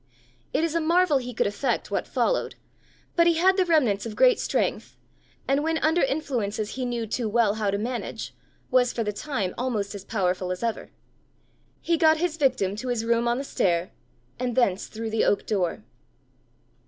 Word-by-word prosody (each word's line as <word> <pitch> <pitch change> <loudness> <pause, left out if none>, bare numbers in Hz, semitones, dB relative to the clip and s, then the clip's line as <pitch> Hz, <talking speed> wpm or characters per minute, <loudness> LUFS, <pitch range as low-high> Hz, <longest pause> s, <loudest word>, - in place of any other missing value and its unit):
It - - +1
is 330 -2 0
a 335 - +1
marvel 335 -2 +3
he 250 -1 -6
could 225 - 0
effect 205 +7 -1
what - - -1
followed; - - 0 0.6
but 340 0 +5
he 340 - +4
had 370 +3 +4
the 375 -1 +2
remnants 250 -12 +2
of 225 -2 -6
great - - +5
strength, - - -1 0.5
and 275 +2 +2
when 320 +1 0
under 320 +2 +2
influences 235 -8 -1
he 255 -1 -3
knew 240 -2 -2
too 225 +1 -2
well 220 -2 +3
how 215 -2 -1
to 200 - 0
manage, 240 +4 -4 0.4
was 250 -1 +4
for 230 - -1
the 210 -1 -2
time 210 -7 -3
almost 220 -6 -2
as 200 -2 -7
powerful 185 -3 -1
as 185 +4 -4
ever: 230 -1 -2 0.9
he 335 -1 +1
got 315 -1 +5
his 330 -1 -1
victim 255 -9 +1
to 255 +4 -5
his 240 -2 -1
room 235 +1 +2
on 240 0 +1
the 275 - -3
stair, 175 -9 0 0.5
and 250 -2 -2
thence 200 -7 +1
through 225 0 -5
the 220 - +1
oak 205 - +1
door. 190 -5 -1
240 Hz, 190 wpm, -25 LUFS, 210-310 Hz, 0.9 s, but